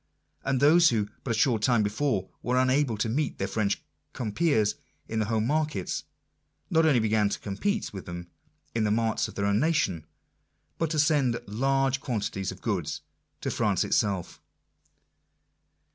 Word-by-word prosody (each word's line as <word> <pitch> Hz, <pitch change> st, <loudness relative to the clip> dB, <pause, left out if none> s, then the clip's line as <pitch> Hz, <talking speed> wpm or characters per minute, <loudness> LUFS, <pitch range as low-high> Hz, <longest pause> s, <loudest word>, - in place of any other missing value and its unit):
And 135 Hz, -1 st, +1 dB
those 165 Hz, +5 st, +6 dB
who, 105 Hz, -3 st, 0 dB
but -, -, -5 dB
a -, -, +2 dB
short 120 Hz, -6 st, +2 dB
time 120 Hz, -1 st, +3 dB
before, 105 Hz, -1 st, 0 dB
were 125 Hz, +1 st, 0 dB
unable 130 Hz, -2 st, +2 dB
to 110 Hz, -, 0 dB
meet 140 Hz, +6 st, -1 dB
their -, -, -1 dB
French 105 Hz, -3 st, -1 dB, 0.3 s
compeers 110 Hz, -2 st, +1 dB, 0.3 s
in 110 Hz, -, -2 dB
the 110 Hz, -, +1 dB
home 110 Hz, -1 st, +1 dB
markets, 150 Hz, -, -1 dB, 0.7 s
not 160 Hz, -1 st, +4 dB
only 140 Hz, -6 st, +4 dB
began 110 Hz, -2 st, +2 dB
to -, -, -2 dB
compete 200 Hz, -, -2 dB
with 95 Hz, -, -8 dB
them 85 Hz, 0 st, -7 dB, 0.4 s
in 115 Hz, -, +1 dB
the 105 Hz, -, +2 dB
marts 110 Hz, 0 st, +1 dB
of -, -, -11 dB
other 100 Hz, 0 st, +1 dB
nations, 110 Hz, -, +1 dB, 0.7 s
but 165 Hz, -, +1 dB
to 155 Hz, -, -2 dB
send 145 Hz, -6 st, +3 dB
large 135 Hz, +4 st, +1 dB
quantities 105 Hz, -6 st, -2 dB
of 95 Hz, -, -11 dB
goods 95 Hz, -9 st, -2 dB, 0.4 s
to -, -, -2 dB
France -, -, +1 dB
itself. 95 Hz, -4 st, -1 dB
115 Hz, 160 wpm, -27 LUFS, 105-140 Hz, 0.7 s, those